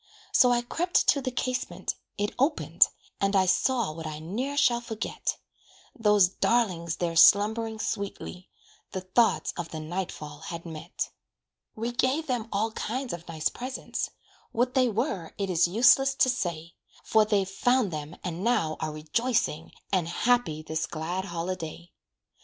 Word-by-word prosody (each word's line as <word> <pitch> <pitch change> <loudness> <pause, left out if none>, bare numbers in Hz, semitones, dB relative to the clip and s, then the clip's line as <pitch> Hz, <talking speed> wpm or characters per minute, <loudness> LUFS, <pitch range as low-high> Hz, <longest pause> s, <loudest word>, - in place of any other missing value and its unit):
So 250 - +5
I 240 0 +2
crept 350 +8 +1
to 280 - +4
the 260 - -2
casement 255 0 -2 0.2
it 205 0 -1
opened, 290 +4 +4 0.3
And 195 0 +1
I 190 -1 +5
saw 220 +2 +2
what 160 0 -7
I 155 -1 -5
ne'er 235 - -3
shall 240 -5 +3
forget 225 -2 -3 0.6
Those 210 -6 +5
darlings 180 -5 0
there 170 -1 -2
slumbering 220 +5 +5
sweetly, 200 -3 -4 0.4
The 190 - -3
thoughts 185 +6 +2
of 175 -2 -4
the 160 - -6
night 175 +4 -3
fall 150 -1 -9
had 170 +1 -7
met. 160 +1 -5 0.6
We 230 +2 -2
gave 260 +6 +1
them 240 -5 -2
all 215 +3 0
kinds 250 +4 -3
of 170 0 -8
nice 160 -2 -1
presents, 255 +2 -4 0.4
What 250 +2 +1
they 255 -2 +3
were, 195 -6 -2
it 195 -2 -1
is 175 0 +4
useless 255 +7 +5
to 255 - +4
say; 170 -9 -3 0.3
For 220 -1 +4
they've 205 -3 +1
found 235 +2 +2
them 150 +1 -5
and 180 0 -4
now 165 -10 +1
are 155 -1 -2
rejoicing, 160 +2 -1 0.2
And 180 -4 +2
happy 175 -4 +1
this 160 0 -2
glad 175 +4 -3
holiday. 170 -1 -5
200 Hz, 155 wpm, -27 LUFS, 170-240 Hz, 0.6 s, So